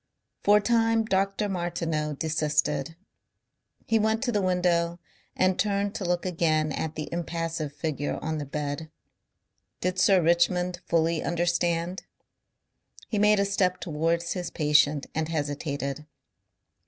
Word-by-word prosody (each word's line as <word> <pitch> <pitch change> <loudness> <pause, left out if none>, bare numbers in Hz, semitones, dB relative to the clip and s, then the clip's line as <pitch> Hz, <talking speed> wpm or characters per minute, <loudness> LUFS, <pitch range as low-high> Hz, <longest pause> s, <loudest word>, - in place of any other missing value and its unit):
For 205 +1 +6
a - - +2
time 225 0 +2
Dr. 195 0 0
Martineau 170 -5 -2
desisted. 155 +1 0 0.9
He 225 0 +2
went 220 +2 +1
to 250 - 0
the 210 -3 +1
window 175 -2 +1 0.4
and 185 0 +2
turned 200 -1 0
to 215 - -4
look 175 0 0
again 160 -3 +1
at 160 +2 -3
the 155 -1 -4
impassive 165 -2 -3
figure 145 0 -3
on 160 -1 -3
the 145 - -4
bed. 150 +2 -4 0.9
Did 185 +1 -1
Sir 190 +1 +5
Richmond 175 +1 +2
fully 165 -1 +2
understand? 175 +1 0 1.1
He 210 - 0
made 210 0 +5
a 200 - +3
step 185 -2 +1
towards 165 +1 -1
his 180 -2 -4
patient 150 -1 +3
and 160 0 -2
hesitated. 145 -1 -3
170 Hz, 130 wpm, -27 LUFS, 155-190 Hz, 1.1 s, For